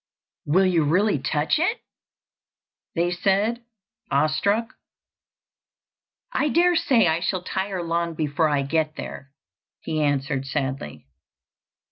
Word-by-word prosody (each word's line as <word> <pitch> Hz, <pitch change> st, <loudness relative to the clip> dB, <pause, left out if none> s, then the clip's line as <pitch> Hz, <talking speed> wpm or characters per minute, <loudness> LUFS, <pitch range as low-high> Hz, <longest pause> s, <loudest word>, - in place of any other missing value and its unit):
"Will 185 Hz, +6 st, +4 dB
you 175 Hz, -4 st, +3 dB
really 180 Hz, +3 st, +2 dB
touch 150 Hz, -, 0 dB
it?" 405 Hz, +9 st, +1 dB, 1.2 s
they 175 Hz, +1 st, +1 dB
said, 200 Hz, +6 st, +1 dB, 0.5 s
awestruck. 165 Hz, -, +1 dB, 1.6 s
"I 300 Hz, -, +1 dB
dare 350 Hz, +3 st, +3 dB
say 240 Hz, -, +3 dB
I 160 Hz, +1 st, +2 dB
shall 180 Hz, +1 st, -2 dB
tire 190 Hz, -1 st, -3 dB
long 170 Hz, 0 st, -1 dB
before 155 Hz, 0 st, +1 dB
I 145 Hz, -2 st, +1 dB
get 155 Hz, +2 st, -1 dB
there," 135 Hz, 0 st, -8 dB, 0.5 s
he 155 Hz, -1 st, -2 dB
answered 140 Hz, -1 st, 0 dB
sadly. 130 Hz, -, -4 dB
165 Hz, 110 wpm, -24 LUFS, 145-195 Hz, 1.6 s, Will